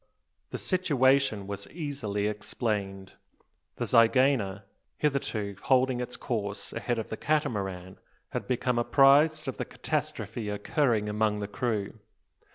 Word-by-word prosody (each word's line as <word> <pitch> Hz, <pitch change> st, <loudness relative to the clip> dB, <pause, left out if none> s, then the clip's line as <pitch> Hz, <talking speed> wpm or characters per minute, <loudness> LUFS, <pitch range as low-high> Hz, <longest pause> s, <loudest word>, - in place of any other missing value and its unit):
The -, -, -4 dB
situation 135 Hz, -, +2 dB
was 100 Hz, 0 st, -6 dB
easily 135 Hz, -, -3 dB
explained. 105 Hz, -2 st, -3 dB, 0.6 s
The -, -, -2 dB
zygaena, 115 Hz, -4 st, +3 dB, 0.3 s
hitherto 115 Hz, -8 st, -1 dB
holding 130 Hz, -1 st, +2 dB
its 125 Hz, 0 st, -5 dB
course 105 Hz, -5 st, -4 dB
ahead 120 Hz, +1 st, -2 dB
of 110 Hz, -, -4 dB
the 110 Hz, -, -4 dB
Catamaran, 95 Hz, -11 st, -2 dB, 0.3 s
had -, -, -4 dB
become 125 Hz, -1 st, 0 dB
apprised 145 Hz, +5 st, +5 dB
of 130 Hz, -, -3 dB
the -, -, -3 dB
catastrophe 110 Hz, -3 st, -3 dB
occurring 105 Hz, +1 st, +1 dB
among 105 Hz, 0 st, +1 dB
the 100 Hz, -, -3 dB
crew. 110 Hz, -1 st, -2 dB
115 Hz, 120 wpm, -28 LUFS, 105-135 Hz, 0.6 s, apprised